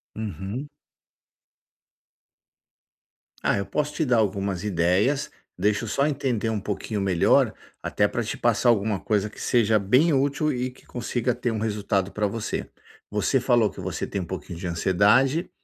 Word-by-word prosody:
Uhum. 110 Hz, -, -5 dB, 2.7 s
Ah, -, -, +2 dB
eu 100 Hz, -, -2 dB
posso 150 Hz, 0 st, -2 dB
te 160 Hz, -, 0 dB
dar 125 Hz, -2 st, +3 dB
algumas 100 Hz, -3 st, 0 dB
ideias. 100 Hz, -, +1 dB, 0.3 s
Deixa 105 Hz, +4 st, +1 dB
eu -, -, -5 dB
só 140 Hz, +5 st, +1 dB
entender 130 Hz, -6 st, -1 dB
um 110 Hz, -2 st, -1 dB
pouquinho 105 Hz, +1 st, -3 dB
melhor, 95 Hz, -3 st, +3 dB, 0.3 s
até -, -, +1 dB
pra -, -, -2 dB
te -, -, -4 dB
passar 120 Hz, -, +2 dB
alguma 105 Hz, -3 st, +2 dB
coisa 105 Hz, -1 st, 0 dB
que -, -, -14 dB
seja 110 Hz, -3 st, +3 dB
bem 130 Hz, -, +3 dB
útil 140 Hz, +3 st, +1 dB
e 125 Hz, 0 st, -2 dB
que -, -, -21 dB
consiga 120 Hz, 0 st, -2 dB
ter 120 Hz, -1 st, -2 dB
um 110 Hz, -, -2 dB
resultado 100 Hz, -3 st, -1 dB
pra 105 Hz, -1 st, 0 dB
você. 110 Hz, +2 st, -4 dB, 0.4 s
Você 105 Hz, +6 st, +1 dB
falou 120 Hz, -4 st, +3 dB
que -, -, -12 dB
você -, -, -3 dB
tem 100 Hz, -, -4 dB
um -, -, -5 dB
pouquinho 90 Hz, -1 st, -7 dB
de 90 Hz, -, -4 dB
ansiedade 100 Hz, -, +3 dB
110 Hz, 160 wpm, -25 LUFS, 100-125 Hz, 2.7 s, dar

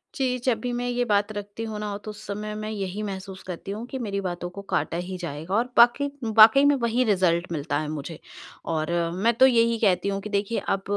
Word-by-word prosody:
जी 255 Hz, -2 st, 0 dB
जब 240 Hz, -4 st, +2 dB
भी 245 Hz, +2 st, -3 dB
मैं 245 Hz, 0 st, -2 dB
ये 245 Hz, 0 st, 0 dB
बात 205 Hz, -1 st, +1 dB
रखती 205 Hz, +1 st, -6 dB
हूँ 220 Hz, -2 st, -5 dB
ना 205 Hz, -1 st, -3 dB
तो 215 Hz, -, -6 dB
उस 210 Hz, +1 st, -12 dB
समय 210 Hz, +1 st, -4 dB
मैं 215 Hz, 0 st, -5 dB
यही 200 Hz, -1 st, -4 dB
महसूस 190 Hz, -1 st, -6 dB
करती 185 Hz, +2 st, -6 dB
हूँ 215 Hz, +4 st, -5 dB
कि 265 Hz, -, -5 dB
मेरी 200 Hz, -4 st, -3 dB
बातों 175 Hz, -1 st, -4 dB
को 195 Hz, +3 st, -9 dB
काटा 170 Hz, -, 0 dB
ही 180 Hz, +1 st, -5 dB
जाएगा 165 Hz, 0 st, -6 dB
और 230 Hz, +3 st, +2 dB
बाके 240 Hz, +4 st, +6 dB, 0.3 s
वाक़ई 225 Hz, +6 st, +9 dB
में 290 Hz, 0 st, +5 dB
वही 235 Hz, -1 st, +1 dB
रिजल्ट 180 Hz, -5 st, +1 dB
मिलता 145 Hz, -2 st, -2 dB
है 155 Hz, -, -3 dB
मुझे। 155 Hz, +1 st, -6 dB, 0.5 s
और 160 Hz, 0 st, -1 dB, 0.2 s
मैं 225 Hz, +6 st, +2 dB
तो 250 Hz, +3 st, +6 dB
यही 230 Hz, -2 st, +3 dB
कहती 200 Hz, -2 st, +2 dB
हूँ 195 Hz, 0 st, -2 dB
कि 215 Hz, -, -7 dB
देखिए 205 Hz, +2 st, -1 dB
अब 195 Hz, -, 0 dB
205 Hz, 230 wpm, -25 LUFS, 185-230 Hz, 0.5 s, वाक़ई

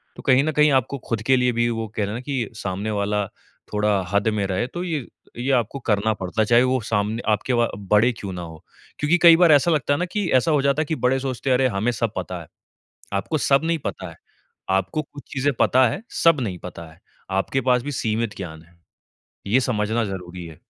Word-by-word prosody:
तो -, -, -10 dB
कहीं 130 Hz, 0 st, +4 dB
न 155 Hz, -, 0 dB
कहीं 150 Hz, -1 st, +4 dB
आपको 135 Hz, +1 st, +1 dB
खुद 115 Hz, -2 st, -1 dB
के 130 Hz, +3 st, +4 dB
लिए 125 Hz, 0 st, +2 dB
भी 120 Hz, 0 st, +1 dB
वो 115 Hz, -1 st, -3 dB
कहते 110 Hz, +1 st, -5 dB
है -, -, -4 dB
ना 115 Hz, -, -4 dB
कि 130 Hz, -5 st, -3 dB
सामने 100 Hz, +1 st, -3 dB
वाला 105 Hz, 0 st, 0 dB, 0.5 s
थोड़ा 105 Hz, -1 st, +2 dB
हद 100 Hz, +1 st, +1 dB
में 100 Hz, -, 0 dB
रहे 95 Hz, +4 st, -1 dB
तो 175 Hz, +7 st, -5 dB
ये 160 Hz, -8 st, -3 dB, 0.3 s
ये 125 Hz, +3 st, -1 dB
आपको 125 Hz, +2 st, 0 dB
करना 110 Hz, -2 st, +1 dB
पड़ता 95 Hz, +1 st, -3 dB
है, -, -, +3 dB
चाहे 120 Hz, +3 st, +5 dB
वो 130 Hz, 0 st, +1 dB
सामने 110 Hz, +1 st, -1 dB
आपके 110 Hz, +4 st, 0 dB
वो 120 Hz, -1 st, +3 dB, 0.2 s
बड़े 110 Hz, +4 st, +5 dB
क्यों 100 Hz, -, -5 dB
ना 90 Hz, -, -5 dB
हो। 80 Hz, -2 st, -10 dB, 0.4 s
क्योंकि 150 Hz, +4 st, +3 dB
कई 170 Hz, -1 st, +10 dB
बार 175 Hz, -2 st, +6 dB
ऐसा 150 Hz, +3 st, +5 dB
लगता 145 Hz, -3 st, +1 dB
है 145 Hz, -, -1 dB
ना 180 Hz, -, 0 dB
कि 205 Hz, -3 st, 0 dB
ऐसा 160 Hz, -, 0 dB
हो 150 Hz, -2 st, +3 dB
जाता 140 Hz, +2 st, +2 dB
है -, -, -1 dB
कि 160 Hz, -, -2 dB
बड़े 130 Hz, +1 st, +3 dB
सोचते 130 Hz, -1 st, -3 dB
है -, -, +4 dB
अरे! 130 Hz, +1 st, +3 dB
हमे 110 Hz, +1 st, 0 dB
सब 115 Hz, -2 st, -2 dB
पता 90 Hz, -1 st, -4 dB
है। 80 Hz, -, -13 dB, 0.7 s
आपको 155 Hz, +10 st, -2 dB
सब 140 Hz, +1 st, +2 dB
नहीं 165 Hz, 0 st, 0 dB
पता 95 Hz, -2 st, -5 dB
है, 80 Hz, -, -14 dB, 0.5 s
आपको 95 Hz, +10 st, 0 dB
कुछ 145 Hz, -1 st, -13 dB
चीज़े 140 Hz, +1 st, +1 dB
पता 130 Hz, 0 st, +5 dB
है, 115 Hz, -, -4 dB, 0.2 s
सब 165 Hz, -4 st, +5 dB
नहीं 95 Hz, -7 st, -3 dB
पता 85 Hz, -1 st, -9 dB
है। 80 Hz, -, -22 dB, 0.4 s
आपके 135 Hz, +7 st, -1 dB
पास 125 Hz, -1 st, +3 dB
भी 145 Hz, +3 st, -4 dB
सीमित 110 Hz, -1 st, -1 dB
ज्ञान 80 Hz, -4 st, -7 dB
है, 85 Hz, +1 st, -25 dB, 0.7 s
ये 115 Hz, +6 st, +4 dB
समझना 115 Hz, -2 st, 0 dB
ज़रुरी 90 Hz, -2 st, -7 dB
है। 80 Hz, -2 st, -13 dB
115 Hz, 235 wpm, -22 LUFS, 100-135 Hz, 0.7 s, कई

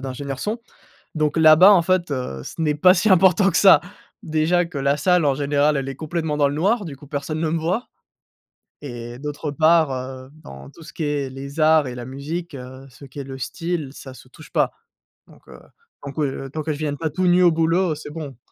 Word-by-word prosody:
d'ingénieur 135 Hz, 0 st, -6 dB
son. 215 Hz, -, -3 dB, 0.6 s
Donc, 155 Hz, -1 st, 0 dB
là-bas 160 Hz, +4 st, +7 dB
en 180 Hz, -4 st, +5 dB
fait, 180 Hz, -2 st, 0 dB
heu, 125 Hz, -, -4 dB
ce 165 Hz, -, -9 dB
n'est 150 Hz, -2 st, +1 dB
pas 180 Hz, +5 st, +5 dB
si 215 Hz, -, +1 dB
important 190 Hz, +1 st, +5 dB
que -, -, 0 dB
ça. 195 Hz, -2 st, +7 dB, 0.4 s
Déjà 160 Hz, +2 st, +1 dB
que 165 Hz, -4 st, -7 dB
la 140 Hz, +1 st, +1 dB
salle 180 Hz, -1 st, +2 dB
en 140 Hz, -2 st, +1 dB
général, 145 Hz, +1 st, +1 dB
elle 135 Hz, -1 st, -3 dB
est 135 Hz, -, -5 dB
complètement 155 Hz, +1 st, -3 dB
dans 145 Hz, -1 st, +3 dB
le 140 Hz, -, -4 dB
noir, 200 Hz, +8 st, +1 dB
du 145 Hz, -6 st, -8 dB
coup 145 Hz, -, -15 dB
personne 145 Hz, +2 st, -4 dB
ne 160 Hz, -1 st, 0 dB
me 165 Hz, -, 0 dB
voit. 180 Hz, +9 st, -2 dB, 0.9 s
Et 120 Hz, -3 st, -8 dB
d'autre 150 Hz, +2 st, -5 dB
part, 160 Hz, +1 st, +3 dB
heu, 130 Hz, 0 st, -7 dB
dans 70 Hz, 0 st, -11 dB
tout 165 Hz, -, -15 dB
ce -, -, -12 dB
qui -, -, -6 dB
est 145 Hz, -2 st, -2 dB
les 140 Hz, +3 st, -9 dB
arts 155 Hz, -2 st, +4 dB
et 125 Hz, -, -6 dB
la 120 Hz, -, -6 dB
musique, 145 Hz, +6 st, -6 dB
heu, 130 Hz, 0 st, -10 dB
ce 130 Hz, +2 st, -15 dB
qui 135 Hz, +1 st, -13 dB
est 140 Hz, -, -4 dB
le 135 Hz, 0 st, -8 dB
style 165 Hz, +2 st, -4 dB
ça 135 Hz, -2 st, -11 dB
se 130 Hz, -, -16 dB
touche 150 Hz, +4 st, -16 dB
pas. -, -, +2 dB, 0.6 s
Donc, -, -, -21 dB
heu, -, -, -13 dB, 0.5 s
donc 140 Hz, +1 st, -8 dB
ouais, 150 Hz, -, +1 dB
heu, 135 Hz, 0 st, -6 dB
tant 155 Hz, -, -4 dB
que 155 Hz, -, -3 dB
je -, -, -2 dB
ne -, -, -10 dB
vienne 145 Hz, -2 st, -2 dB
pas 160 Hz, 0 st, -2 dB
tout 185 Hz, +5 st, -2 dB
nu 180 Hz, 0 st, +4 dB
au 175 Hz, -2 st, +6 dB
boulot, 165 Hz, +2 st, +1 dB
heu, -, -, -6 dB
c'est 150 Hz, 0 st, -9 dB
bon. 145 Hz, -6 st, -8 dB
150 Hz, 240 wpm, -21 LUFS, 135-165 Hz, 0.9 s, là-bas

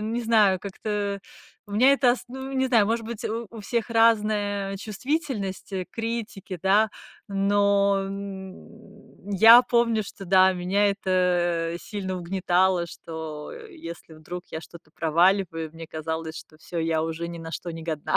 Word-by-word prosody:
не 225 Hz, +3 st, -2 dB
знаю, 215 Hz, -4 st, +4 dB
как-то 200 Hz, +1 st, -3 dB, 0.4 s
у 205 Hz, -, -17 dB
меня 250 Hz, +7 st, +5 dB
это 260 Hz, -3 st, +4 dB
ос 245 Hz, -, +1 dB
ну, 265 Hz, +2 st, -7 dB
не 265 Hz, -1 st, +1 dB
знаю, 225 Hz, -5 st, +4 dB
может 225 Hz, 0 st, -1 dB
быть, 235 Hz, 0 st, -6 dB
у 225 Hz, +1 st, -3 dB
у 225 Hz, -2 st, -9 dB
всех 230 Hz, +2 st, -2 dB
разная 210 Hz, -3 st, +2 dB
чувствительность 220 Hz, -, -3 dB
к 190 Hz, -2 st, -3 dB
критике, 225 Hz, -5 st, -4 dB
да, 205 Hz, +3 st, +3 dB, 0.4 s
но, 200 Hz, 0 st, +2 dB
м, 200 Hz, +1 st, -10 dB
я 225 Hz, +5 st, +9 dB
помню, 235 Hz, -2 st, +2 dB
что, 195 Hz, -1 st, -10 dB
да, 190 Hz, +1 st, +5 dB
меня 185 Hz, +3 st, +1 dB
это 175 Hz, -3 st, +1 dB
сильно 190 Hz, -3 st, -4 dB
угнетало, 180 Hz, 0 st, +1 dB
что 160 Hz, -2 st, -7 dB
если 325 Hz, -, -10 dB
вдруг 175 Hz, +3 st, -8 dB
я 160 Hz, -, -5 dB
что-то 165 Hz, -1 st, -14 dB
проваливаю, 165 Hz, 0 st, +1 dB
мне 165 Hz, 0 st, -9 dB
казалось, 160 Hz, 0 st, -5 dB
что 155 Hz, -, -12 dB
всё, 170 Hz, +2 st, -6 dB
я 160 Hz, -1 st, +1 dB
уже 165 Hz, +1 st, -4 dB
ни 170 Hz, -, -7 dB
на 165 Hz, 0 st, -8 dB
что 175 Hz, -, -5 dB
не 165 Hz, -1 st, -7 dB
годна. 155 Hz, -3 st, -1 dB
195 Hz, 155 wpm, -25 LUFS, 175-220 Hz, 0.4 s, я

